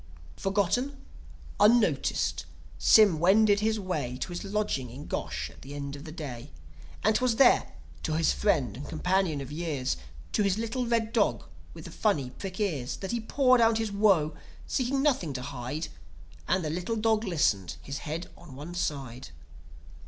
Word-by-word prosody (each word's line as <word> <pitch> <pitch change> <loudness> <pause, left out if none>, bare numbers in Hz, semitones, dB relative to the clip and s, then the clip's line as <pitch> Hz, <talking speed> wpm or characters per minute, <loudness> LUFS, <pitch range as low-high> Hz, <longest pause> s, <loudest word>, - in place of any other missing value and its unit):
Forgotten, 205 +8 0 0.6
unnoticed, 220 +1 +3 0.3
Sym 205 -8 +6
wended 200 +4 +5
his 220 +1 +1
way 150 -10 -3
To - - -2
his 175 - -5
lodging 200 - -1
in - - -9
Gosh - - -4
at - - -17
the 145 +2 -8
close 140 0 -5
of 145 +2 -10
the 155 - -7
day. 140 -5 -7 0.5
And 215 0 +3
'twas 250 0 +2
there, 270 - +4 0.3
to 160 - -2
his 165 - +3
friend 130 - +1
and 140 +4 -8
companion 180 -2 0
of 135 +1 -8
years 150 - -2 0.3
To - - +1
his 200 -1 +2
little 230 +2 -2
red 230 -1 0
dog - - +2 0.3
with - - -10
the - - -8
funny 150 - 0
prick 190 +5 -7
ears 150 -12 -1
That 195 - -5
he 235 - -1
poured 255 +2 +3
out 225 -1 +4
his 225 -2 -2
woe; 195 -7 +3 0.3
seeking 270 +1 0
nothing 220 - +1
to 125 -1 -4
hide; 140 +3 -4 0.6
And 185 -2 +1
the 150 - -1
little 180 +7 -2
dog 220 0 +2
listened, 145 - +1
his 140 +1 -5
head 165 +2 -5
on 145 -7 -13
one 150 +6 -8
side. 135 -7 -3
180 Hz, 170 wpm, -28 LUFS, 145-220 Hz, 0.6 s, Sym